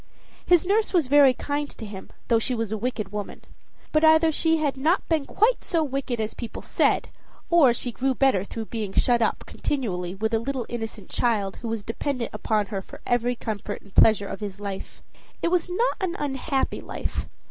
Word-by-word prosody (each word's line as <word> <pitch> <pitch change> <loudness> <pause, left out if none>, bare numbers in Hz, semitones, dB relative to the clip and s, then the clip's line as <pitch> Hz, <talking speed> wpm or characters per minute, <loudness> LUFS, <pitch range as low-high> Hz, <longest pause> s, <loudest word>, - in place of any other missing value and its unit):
His 350 0 +5
nurse 415 +3 +1
was 335 -7 +3
very 280 -2 +7
kind 290 +2 -2
to 225 - -8
him 200 -2 -9 0.2
though 230 -2 +4
she 250 +2 -1
was 225 -2 -2
a - - 0
wicked 220 -3 -3
woman. 210 -1 -6 0.5
But 310 0 +2
either 315 0 +6
she 325 +1 +2
had 295 -3 0
not 310 +8 +1
been 315 -4 0
quite 460 +4 +2
so 330 -3 +1
wicked 270 -4 -2
as 215 0 -2
people 235 - -7
said, - - +1 0.4
or 320 -7 +7
she 245 +1 -3
grew 260 +3 0
better 265 -9 +3
through 220 +2 -6
being 215 -4 -3
shut 240 -1 +3
up 225 - +1
continually 185 -10 -3
with 220 +3 -1
a 225 - +3
little 255 +1 -3
innocent 225 -4 -6
child 210 -5 0
who 235 - -6
was 225 -2 -3
dependent 245 +2 -3
upon 210 0 0
her 195 - -1
for - - -12
every 245 0 +1
comfort 210 -2 -5
and 200 - -18
pleasure 205 -2 +5
of - - -6
his 205 -2 -6
life. 200 -2 -7 0.4
It 335 - +3
was 360 0 +1
not 455 +8 +1
an 365 -2 -1
unhappy 270 0 -1
life. - - -5
245 Hz, 200 wpm, -25 LUFS, 215-295 Hz, 0.5 s, very